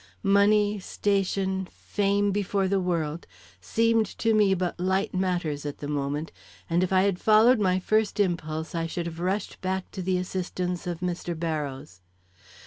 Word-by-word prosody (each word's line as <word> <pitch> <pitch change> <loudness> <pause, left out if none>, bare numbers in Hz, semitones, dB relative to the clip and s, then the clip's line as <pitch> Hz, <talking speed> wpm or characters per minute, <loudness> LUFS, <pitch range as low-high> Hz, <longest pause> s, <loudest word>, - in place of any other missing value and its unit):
Money, 205 +1 +4
station, 190 -1 -1
fame 205 0 0
before 200 -1 0
the 195 +1 +1
world, 170 -3 -2 0.3
seemed 225 - +2
to 225 +3 0
me 205 -3 +4
but 180 -1 -2
light 190 +2 0
matters 175 -6 -1
at 145 -1 -5
that 145 - -6
moment, 145 +2 -2 0.4
and 170 +1 +1
if 185 - -1
I 190 0 +4
had 195 -3 +1
followed 220 +3 +5
my 185 -2 +2
first 215 +3 +1
impulse 160 -4 -1
I 165 -1 -1
should 170 +1 -4
have 165 -1 -6
rushed 190 +3 -2
back 190 0 -3
to 190 - -5
the 185 0 0
assistance 180 -1 -3
of 175 -1 -4
Mr. 175 -1 -3
Barrows. 140 - -4
185 Hz, 160 wpm, -26 LUFS, 170-200 Hz, 0.4 s, followed